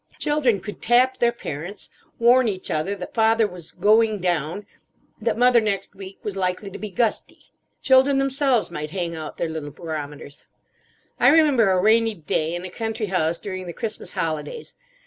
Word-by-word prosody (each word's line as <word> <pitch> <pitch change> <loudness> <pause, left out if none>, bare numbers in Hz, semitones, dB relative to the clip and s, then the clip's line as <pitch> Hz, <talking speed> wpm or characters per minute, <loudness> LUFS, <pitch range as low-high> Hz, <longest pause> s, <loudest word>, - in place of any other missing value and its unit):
Children 265 -9 +1
could 210 - -8
tap 255 +2 +3
their 240 -1 +3
parents, 180 -3 -6 0.3
warn 245 +1 +5
each 190 -3 -3
other 170 +6 -1
that 180 -2 -8
father 225 0 +3
was 180 -5 -5
"going 215 0 +3
down;" 175 +2 -2 0.6
that 230 +1 0
mother 245 -1 +5
next 200 -2 -2
week 195 0 -10
was 205 -2 -4
likely 190 +1 -2
to - - -8
be 215 - -5
"gusty." 215 +4 -2 0.3
Children 265 +1 +5
themselves 270 -5 +1
might 150 -2 -5
hang 170 -1 -3
out 155 -1 -7
their 170 - -1
little 160 -2 -5
barometers. 145 -2 -7 0.7
I - - +6
remember 290 -10 +4
a 185 -1 +3
rainy 220 +2 +3
day 160 0 -2
in 175 +1 -5
a 185 - -7
country 225 +1 -3
house 165 -2 +1
during 185 -1 -6
the 170 - -6
Christmas 220 +1 -5
holidays. 165 - -4
200 Hz, 170 wpm, -23 LUFS, 170-235 Hz, 0.7 s, I